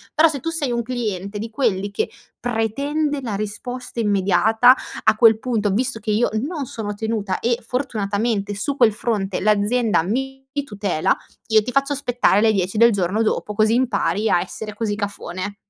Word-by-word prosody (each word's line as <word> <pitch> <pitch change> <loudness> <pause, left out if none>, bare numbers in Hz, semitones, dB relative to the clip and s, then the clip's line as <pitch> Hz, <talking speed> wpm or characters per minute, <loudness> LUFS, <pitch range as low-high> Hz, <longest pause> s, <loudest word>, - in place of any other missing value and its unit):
Però, 320 +2 +6
se 290 -3 -3
tu 330 - -3
sei 305 -6 -1
un 235 0 0
cliente 215 -5 -4
di 225 +2 -5
quelli 210 -5 -1
che 200 - -1 0.3
pretende 280 +6 -1
la 225 -6 -3
risposta 245 +5 -5
immediata, 215 +3 +4 0.3
a - - +4
quel 225 -1 +6
punto, 225 -5 0
visto 240 +3 0
che 215 0 -3
io 220 +3 +2 0.2
non 310 -4 -4
sono 215 -4 -5
tenuta 205 -2 -2
e, 240 0 0
fortunatamente 210 -4 -1
su 270 +8 -3
quel 235 -5 +5
fronte 205 -3 -2
l'azienda 215 0 +2
mi 270 +7 -3 0.2
tutela, 200 - 0 0.3
io 220 -1 +5
ti 250 - -4
faccio 275 +1 +1
aspettare 245 -7 +2
le 220 0 +4
10 195 +1 -1
del 235 +2 +6
giorno 195 +2 0
dopo, 215 -1 -1
così 215 +2 +3
impari 220 -3 +1
a 175 - +4
essere 210 +4 -6
così 210 -1 -2
cafone. 200 -1 -5
220 Hz, 170 wpm, -21 LUFS, 205-250 Hz, 0.3 s, Però